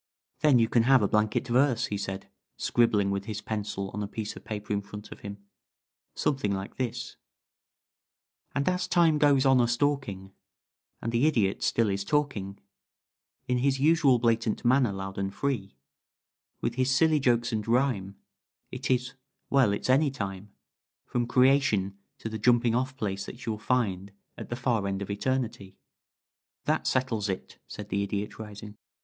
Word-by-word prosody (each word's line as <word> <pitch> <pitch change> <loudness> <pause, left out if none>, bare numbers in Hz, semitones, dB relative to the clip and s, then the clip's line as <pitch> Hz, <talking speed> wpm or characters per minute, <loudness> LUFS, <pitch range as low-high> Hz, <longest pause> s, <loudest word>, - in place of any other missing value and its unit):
"Then 145 -3 +5
you 115 -1 +4
can 115 +1 +3
have 135 -5 +6
a - - +3
blanket 105 +4 +1
verse," 125 -1 +3
he 105 - -3
said, 95 -1 -5 0.3
scribbling 105 -4 +2
with 100 0 -2
his 110 -2 -4
pencil 105 -3 -4
on 105 - -4
a 100 - -2
piece 105 +1 -5
of - - -11
paper 105 -1 -4
in 100 - 0
front 105 +1 -10
of - - -9
him. 100 0 -7 0.8
"Something 135 -8 0
like 95 0 -4
this: 125 -3 -4 1.4
"And 140 0 0
as 180 0 +1
Time 165 -4 +3
goes 145 -2 +4
on 135 -2 +5
a 120 - +3
stalking, 120 -7 -1 0.7
And 115 - -1
the 120 +6 +3
Idiot 105 -10 +1
still 115 -1 +2
is 100 -1 -1
talking 105 -7 -1 0.9
In 125 -1 +1
his 135 +1 +1
usual 150 -3 +4
blatant 115 -1 0
manner, 125 -2 +4
loud 95 0 -5
and 95 0 -2
free, 110 -5 -3 0.9
With 120 - -1
his 130 +1 0
silly 155 +4 +4
jokes 120 -3 +2
and 110 -1 -2
rhyme, 115 -6 +1 0.6
It - - -5
is 125 0 +1 0.4
well 130 -6 +4
it's 100 - -2
any 140 +4 +4
time 100 -5 -6 0.5
From 120 -1 -1
Creation 125 -7 +3 0.2
to - - -6
the 110 0 -5
jumping 120 +1 +3
off 130 +2 -1
place 100 -5 -3
that 125 - -9
you'll 110 -2 -2
find 100 -5 -1 0.2
at - - -9
the 120 - -2
far 120 -5 0
end 100 0 -2
of 100 - -9
Eterni 130 +4 0
tie." 95 -5 -14 0.9
"That - - 0
settles 115 -6 0
it," 95 - -5
said 105 -1 -8
the 100 0 0
Idiot, 100 +1 -3
rising. 105 -1 -9
115 Hz, 170 wpm, -28 LUFS, 100-130 Hz, 1.4 s, have